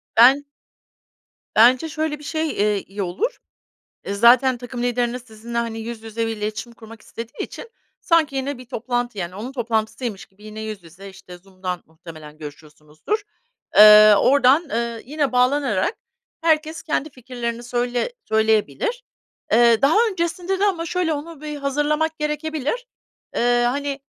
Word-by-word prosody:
Ben 260 +5 +7 1.1
Bence 250 +8 +5
şöyle 310 -1 -3
bir - - -13
şey, 315 +2 -2
eee, 205 -5 0
iyi 200 +2 -6
olur. 280 - -2 0.7
Iıı, 200 - -3
zaten 245 +4 +5
takım 245 0 -6
lideriniz 245 0 -1
sizinle, 235 0 -8
hani, 230 -1 -2
yüz 225 0 -7
yüze 225 +1 -3
bir 225 -1 -4
iletişim 215 +3 -5
kurmak 225 0 -13
istediği 230 0 -7
için 465 - -9 0.3
sanki 325 -5 +2
yine 270 +1 -2
bir 255 - -12
toplantı, 240 -1 -3
yani, 180 -1 -4
onun 225 +6 -6
toplantısıymış 230 -3 -3
gibi 195 +2 -23
yine 215 0 -8
yüz 215 -3 -6
yüze, 180 +4 -12
işte, 190 -2 -13
Zoom’dan 185 -1 -6
muhtemelen 160 -2 -13
görüşüyorsunuzdur. 150 - -6 0.5
Eee, 210 0 +9
oradan, 280 - +4
eee, 235 0 -2
yine 290 +1 -1
bağlanarak 250 - +1 0.5
herkes 320 0 +1
kendi 310 -2 -2
fikirlerini 240 -2 -6
söyle 245 - -1 0.2
söyleyebilir. 220 - +1 0.5
Eee, 235 0 +5
daha 280 +6 +4
öncesinde 355 +1 -2
de 405 - +3
ama 355 -5 0
şöyle, 345 -1 0
onu 300 +1 -7
bir 300 -1 -5
hazırlamak 295 +3 0
gerekebilir. 300 - -3 0.5
Eee, 240 0 +2
hani, 280 +2 -2
245 Hz, 145 wpm, -21 LUFS, 215-295 Hz, 1.1 s, Eee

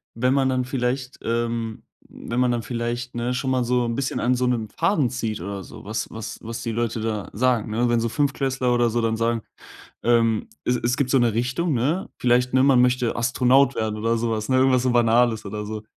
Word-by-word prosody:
wenn 125 +3 +2
man 135 -1 +2
dann 130 -1 0
vielleicht, 130 0 -2
ähm 115 -1 -2 0.2
wenn 120 +1 -5
man 125 -1 +3
dann 120 - -1
vielleicht, 120 +2 -4
ne, 120 +1 -1
schon 130 +1 -2
mal 130 -1 +1
so 125 +1 +1
'n 115 0 -2
bisschen 135 0 -2
an 125 +1 +2
so 125 0 0
'nem 115 -4 -1
Faden 165 - +1
zieht 115 -6 -3
oder 100 +1 -5
so, - - -12
was 110 +2 -4
was 110 -2 -6
was 115 +1 -6
die 115 - -3
Leute 115 0 -2
da 110 -3 -3
sagen, 115 -1 +1
ne? 120 +2 +1
Wenn 120 -1 +2
so 115 0 -1
Fünftklässler 135 -2 0
oder 120 -1 +2
so 120 +1 0
dann 110 0 0
sagen, 115 0 0 0.6
ähm 115 -2 +2 0.2
es 125 - +1
es 120 +2 -1
gibt 130 -2 0
so 135 - +4
'ne 120 -2 +2
Richtung, 135 +7 0
ne? 145 +10 0
Vielleicht, 125 0 +2
ne, 130 - +5
man 135 -3 +5
möchte 125 -1 +1
Astronaut 130 +3 +3
werden 110 -1 -2
oder 115 +1 +1
sowas, 110 0 -2
ne, 130 - +3
irgendwas 130 -1 +4
so 130 - +1
Banales 120 -1 +3
oder 105 +1 -5
so. 110 0 -5
120 Hz, 220 wpm, -23 LUFS, 115-125 Hz, 0.6 s, ne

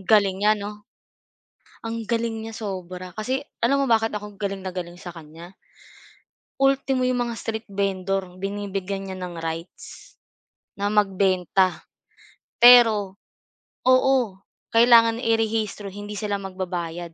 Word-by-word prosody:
Galing 195 -1 +3
niya 210 +1 +4
'no? 210 0 -7 1.0
Ang 225 -1 -5
galing 230 -1 -1
niya 225 - -7
sobra 185 -3 -6
kasi, 255 +5 -2 0.2
alam 275 +4 +2
mo - - +1
bakit 225 -1 +2
ako 210 -1 -7
galing 195 -2 -3
na 185 - -4
galing 175 -1 -6
sa 175 0 -9
kanya? 165 +2 -12 1.0
Ultimo 270 -1 +2
yung 255 0 +1
mga 235 - -4
street 225 0 -5
vendor 195 -2 -2
binibigyan 195 -1 -4
niya 190 - -6
ng 180 -1 -6
rights, 165 +2 -7 0.6
na 200 +1 -2
magbenta. 190 -3 +1 0.8
Pero, 225 -5 +7 0.7
oo, 265 +1 +5 0.6
kailangan 230 -1 +6
i-rehistro 225 -3 -1
hindi 205 +2 -8
sila 205 -1 -2
magbabayad, 175 -3 -5
200 Hz, 125 wpm, -24 LUFS, 185-225 Hz, 1.0 s, Pero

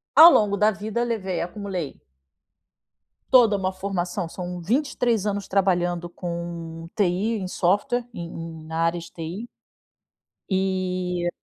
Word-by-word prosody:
ao 330 +3 +11
longo 205 -2 +4
da 210 +2 +5
vida, 215 +4 -2
levei 195 -7 -2
acumulei 180 -3 -4 1.3
toda 235 -6 +6
uma 190 -1 -1
formação, 185 -1 -3
são 180 0 -6
23 235 - +1
anos 200 -1 -2
trabalhando 175 -3 +1
com 170 -1 -6
TI 205 +3 +1
em 185 -2 -4
software, 220 +8 +1
em 170 -4 -5
em 165 -1 -8
na 160 +1 -5
área 165 +1 +1
de 165 - -11
TI. 180 +8 -6 1.0
E 185 -2 0
185 Hz, 125 wpm, -24 LUFS, 175-210 Hz, 1.3 s, ao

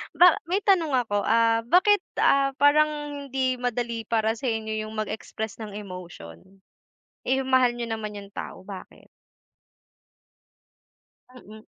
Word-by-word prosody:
Ba 360 -1 +6
may 385 +4 0
tanong 340 -7 +3
ako, 205 -5 0
ah, 230 +1 +3
bakit, 410 - +5 0.2
ah, 275 0 +3
parang 295 0 +2
hindi 260 -1 -1
madali 235 -2 -3
para 225 0 0
sa 265 - -3
inyo 220 -1 -2
'yong 215 - -9
mag-express 215 0 -5
ng 210 -2 -7
emotion? 180 - -9 0.9
Eh, 265 +1 +2
'yong 265 - -6
mahal 255 -2 +4
niyo 235 -1 -5
naman 215 -2 -4
'yong 200 0 -10
tao, - - -7
bakit? 190 -1 -11 2.3
Mm. 215 -3 -13
230 Hz, 130 wpm, -25 LUFS, 215-275 Hz, 2.3 s, Ba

